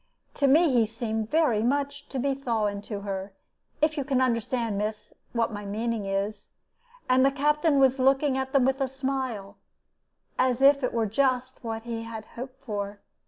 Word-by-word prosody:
To 280 - +2
me 305 +1 +5
he 230 -3 +4
seemed 220 -1 -3
very 300 -9 +3
much 285 +3 -1
to 270 - -5
be 275 +2 +1
thawing 220 -6 -1
to 205 -3 -4
her 195 -1 -5 0.5
if 310 0 +2
you 285 - 0
can 265 -1 +1
understand, 235 -2 0
miss, 210 0 -4 0.2
what 230 -2 0
my 205 0 -5
meaning 215 +1 -2
is 200 +1 -3 0.6
and 255 +1 +4
the 270 - +6
Captain 295 +2 +2
was 265 0 +4
looking 270 +1 +3
at 265 0 -2
them 270 -2 +4
with 265 +1 +1
a 270 - +2
smile, 260 -7 -3 0.8
as 255 -1 +2
if 275 0 +5
it 250 - +1
were 230 -1 0
just 255 +3 0
what 225 -1 -4
he 230 -1 -4
had 225 -1 -7
hoped 260 +2 -8
for. 205 -2 -4
250 Hz, 180 wpm, -27 LUFS, 220-270 Hz, 0.8 s, the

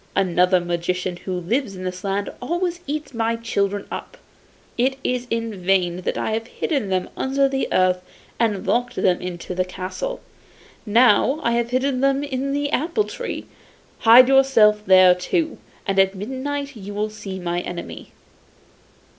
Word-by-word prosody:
Another 180 -1 +3
magician 175 +1 -2
who 185 - -5
lives 210 +4 -1
in 185 - -8
this 185 0 -5
land 200 0 -2
always 345 +5 -2
eats 295 -1 -4
my 230 0 0
children 205 -3 -1
up. - - -7 0.6
It 260 +2 +1
is 250 0 -1
in 230 -4 -3
vain 180 -2 +2
that 185 - -3
I - - -1
have 225 +1 -2
hidden 270 - -2
them 185 -1 0
under 275 +1 +1
the 270 0 -1
earth 185 0 +2 0.4
and 215 -4 0
locked 245 +1 0
them 180 -2 +1
into 180 0 -5
the 185 0 +1
castle. 185 - -5 0.7
Now 240 +5 +4
I 235 - +2
have 235 0 0
hidden 255 +1 0
them 275 +1 +2
in 275 -1 -2
the 285 0 -1
apple 335 - +1
tree; - - -6 0.5
hide 240 +3 +8
yourself 265 -6 +5
there 185 -1 +7
too, 315 - -2 0.3
and 195 -1 +1
at 195 0 +3
midnight 275 +6 -4
you 205 -1 -8
will 210 +1 -1
see 195 -3 -7
my 175 -1 -2
enemy. 175 -1 -7
220 Hz, 160 wpm, -22 LUFS, 185-270 Hz, 0.7 s, hide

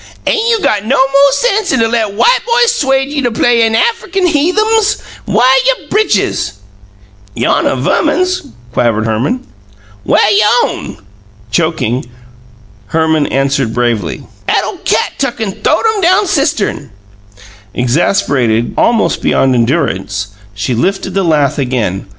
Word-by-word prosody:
Ain' 445 +1 +1
you 460 -1 +2
got 205 - 0
no 255 +6 0
mo' 275 +1 +4
sense 415 - 0
'an - - +1
to 225 - +2
let 225 -3 -1
white 480 - +3
boys 475 0 +2
'suede 270 - 0
you 275 -5 0
play 235 +1 +2
you 225 - +3
Affikin 450 - 0
heathums? 415 +7 +1 0.3
Whah - - +1 0.2
you - - -1
britches?" 430 0 0 0.8
"Yonnuh - - +1
Verman's," 365 0 0 0.3
quavered 115 -3 +1
Herman. 125 - -2 0.6
"Whah - - +3
y'own?" 210 +3 +1 0.5
Choking, 135 -5 -1 0.8
Herman 160 -2 +1
answered 135 -4 -1
bravely: 115 -8 -1 0.3
"'At - - +2
ole - - -5
cat - - 0
tuck 270 -3 -2
an' 220 -3 -2
th'owed - - +1
'em 410 - -3
down 370 +4 +3
cistern!" 275 - -1 0.9
Exasperated 125 - 0
almost 230 -2 +1
beyond 135 -1 +2
endurance, 105 - -1 0.3
she 105 +5 -2
lifted 190 +9 -1
the 195 - +1
lath 150 -6 +1
again. 120 -8 -2
215 Hz, 130 wpm, -12 LUFS, -, 0.9 s, mo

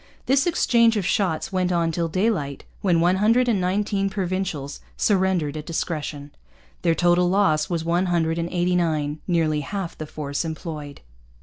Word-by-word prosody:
This 270 +4 +3
exchange 235 -9 +3
of 195 - -1
shots 185 -2 0
went 185 -1 +1
on 170 -2 +1
till 170 +1 -1
daylight, 165 -6 -1 0.2
when 175 -4 +2
one 180 +2 +3
hundred 230 +5 +3
and 215 -6 +2
nineteen 195 +2 0
Provincials 185 -7 -3 0.2
surrendered 185 -7 +1
at 155 0 -6
discretion. 150 -3 -4 0.5
Their 165 -2 +2
total 175 +1 +3
loss 170 -6 +2
was 165 -2 -2
one 175 +3 +1
hundred 165 -1 0
and 170 0 -2
eighty 180 0 0
nine, 155 -3 0
nearly 160 -4 +1
half 185 +3 -5
the 155 - -7
force 145 -1 -3
employed. 155 -3 -6
175 Hz, 165 wpm, -23 LUFS, 155-190 Hz, 0.5 s, This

